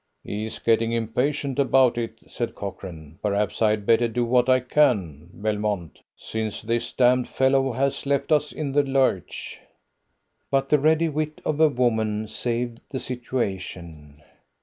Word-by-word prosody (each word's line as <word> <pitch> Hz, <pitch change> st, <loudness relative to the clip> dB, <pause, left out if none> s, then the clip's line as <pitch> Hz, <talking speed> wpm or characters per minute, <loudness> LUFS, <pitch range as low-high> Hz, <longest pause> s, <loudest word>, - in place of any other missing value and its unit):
"He's 110 Hz, +2 st, -4 dB
getting 115 Hz, 0 st, +2 dB
impatient 130 Hz, +5 st, -1 dB
about 130 Hz, -2 st, +4 dB
it," 115 Hz, -1 st, -4 dB
said 120 Hz, -, -4 dB
Cochrane. 85 Hz, -5 st, -8 dB
"Perhaps 105 Hz, 0 st, -1 dB
I 110 Hz, -, +5 dB
had 105 Hz, -1 st, -1 dB
better 115 Hz, +2 st, +4 dB
do 120 Hz, +1 st, -1 dB
what 125 Hz, +1 st, +3 dB
I 130 Hz, 0 st, +5 dB
can, 105 Hz, -, +1 dB
Belmont, 105 Hz, -6 st, -3 dB, 0.2 s
since 110 Hz, -2 st, -4 dB
this 115 Hz, +1 st, -1 dB
damned 125 Hz, 0 st, +3 dB
fellow 135 Hz, 0 st, +2 dB
has 135 Hz, +2 st, -1 dB
left 140 Hz, +1 st, 0 dB
us 150 Hz, -1 st, +3 dB
in 150 Hz, -3 st, -4 dB
the 145 Hz, +2 st, +4 dB
lurch." 135 Hz, -9 st, -1 dB, 0.9 s
But 135 Hz, 0 st, +1 dB
the 150 Hz, -, +4 dB
ready 160 Hz, +3 st, +3 dB
wit 155 Hz, 0 st, -3 dB
of 155 Hz, -1 st, -1 dB
a 160 Hz, -1 st, +6 dB
woman 110 Hz, -4 st, 0 dB
saved 120 Hz, +1 st, -3 dB
the 130 Hz, -, -4 dB
situation. 90 Hz, -, -5 dB
120 Hz, 150 wpm, -24 LUFS, 105-135 Hz, 0.9 s, a